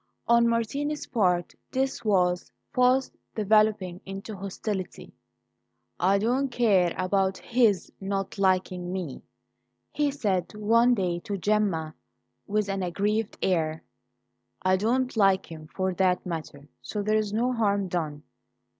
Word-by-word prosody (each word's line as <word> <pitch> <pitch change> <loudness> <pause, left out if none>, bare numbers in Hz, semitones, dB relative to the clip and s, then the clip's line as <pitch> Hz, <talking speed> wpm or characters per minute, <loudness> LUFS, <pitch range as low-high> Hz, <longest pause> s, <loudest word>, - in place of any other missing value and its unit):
On 235 0 +5
Martini's 280 +6 -1
part 180 -8 +1 0.2
this 265 -2 -1
was 180 -4 +1 0.2
fast 255 0 +3 0.2
developing 210 -4 +2
into 195 +3 -7
hostility. 195 0 -5 0.9
"I 195 +2 +4
don't 250 +6 +1
care 205 -8 +2
about 190 0 +1
his 225 -6 +1
not 195 0 -3
liking 185 -2 +1
me," 180 -8 -4 0.7
he 295 -1 +1
said 210 -9 -1
one 230 +4 +4
day 180 -4 -1
to 200 +3 -4
Gemma 190 -6 0 0.5
with 210 0 0
an 195 -1 -2
aggrieved 205 +4 -1
air. 160 -3 0 0.8
"I 185 0 +4
don't 245 +6 0
like 195 -4 +3
him, 155 -1 -9
for 185 +3 -2
that 180 0 +1
matter; 155 -4 -6
so 210 -1 -4
there's 215 0 +1
no 240 +4 +1
harm 200 -4 +1
done. 155 -4 -3
200 Hz, 125 wpm, -27 LUFS, 180-225 Hz, 0.9 s, On